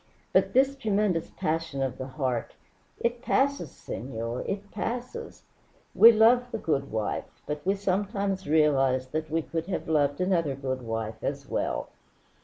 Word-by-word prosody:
"But - - +3
this 270 +2 +4
tremendous 210 -8 0
passion 160 -5 -2
of 130 -1 -3
the 130 - -4
heart 130 -4 -2 0.4
it 235 0 -1
passes, 280 +2 +1
senor, 115 -1 -5
it 200 0 -4
passes. 250 - -5 0.5
We 230 - +9
love 235 +3 +5
the - - -3
good 140 -3 -1
wife, 110 -1 -2 0.2
but 150 0 -4
we 195 - +3
sometimes 195 0 -1
realize 135 -4 +3
that 155 +2 -3
we 165 +1 0
could 165 +1 -4
have 195 - -3
loved 145 -3 +2
another 170 -6 +1
good 130 -1 -3
wife 115 -1 -4
as - - -3
well." - - -2
160 Hz, 150 wpm, -28 LUFS, 135-205 Hz, 0.5 s, We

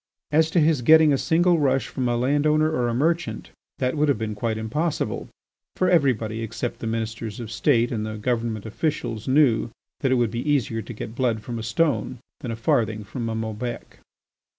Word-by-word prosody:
As 160 +1 +3
to 170 - +2
his 155 -3 +3
getting 155 +3 +6
a - - +3
single 175 +1 +3
rush 135 -2 +1
from 125 -2 -2
a 120 - +1
land 145 +5 +2
owner 155 +1 +3
or 125 -6 0
a 120 - -1
merchant, 165 +6 -1 0.3
that 130 +1 0
would 150 0 +2
have 140 - +2
been 110 0 -3
quite 110 +1 -2
impossible, 150 +9 -2 0.5
for 185 0 +2
everybody 115 -9 +2
except 115 +2 -4
the 115 - -4
Ministers 110 -1 -4
of 115 -2 -6
State 120 0 +2
and 110 -3 -2
the 110 0 -4
Government 115 -1 -2
officials 115 -2 -3
knew 130 -4 +3 0.3
that 135 -3 0
it - - +4
would 120 -3 +1
be 120 0 -3
easier 120 -6 +1
to 115 +3 -8
get 110 0 -7
blood 120 -3 0
from 120 -2 -5
a - - -4
stone 130 +3 0 0.2
than 130 - -6
a 115 - -2
farthing 110 -1 0
from 115 +3 -5
a 110 - -2
Maubec. 110 +2 -5
120 Hz, 200 wpm, -24 LUFS, 110-145 Hz, 0.5 s, getting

